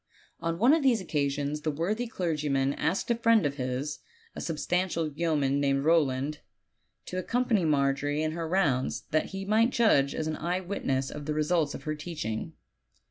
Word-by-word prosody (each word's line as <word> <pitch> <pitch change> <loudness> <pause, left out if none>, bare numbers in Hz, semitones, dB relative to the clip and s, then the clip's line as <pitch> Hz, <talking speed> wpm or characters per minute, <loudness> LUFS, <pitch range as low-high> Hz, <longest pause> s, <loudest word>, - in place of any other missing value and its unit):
On 165 0 -2
one 240 - +5
of 325 - +3
these 255 -5 +3
occasions 145 -3 -1
the 155 - -1
worthy 195 +11 -1
clergyman 150 -9 0
asked 185 +10 -1
a - - +3
friend 230 -4 +3
of 140 0 -1
his, 130 +3 -3 0.4
a - - -5
substantial 170 +1 -1
yeoman 145 -3 +1
named 140 0 +1
Eowland, 150 -2 +2 0.7
to 185 - -4
accompany 230 -2 +1
Margery 145 0 +1
in 155 - 0
her 165 0 -4
rounds, 155 -8 +1
that 155 - +2
he 195 0 -6
might 220 +4 +3
judge 215 - +3
as 160 - -2
an 155 0 -2
eye 175 +3 -1
witness 135 -8 -2
of 150 0 -7
the 150 - -1
results 155 -1 +1
of - - -9
her 155 - -2
teaching. 150 -8 -5
155 Hz, 175 wpm, -28 LUFS, 140-185 Hz, 0.7 s, one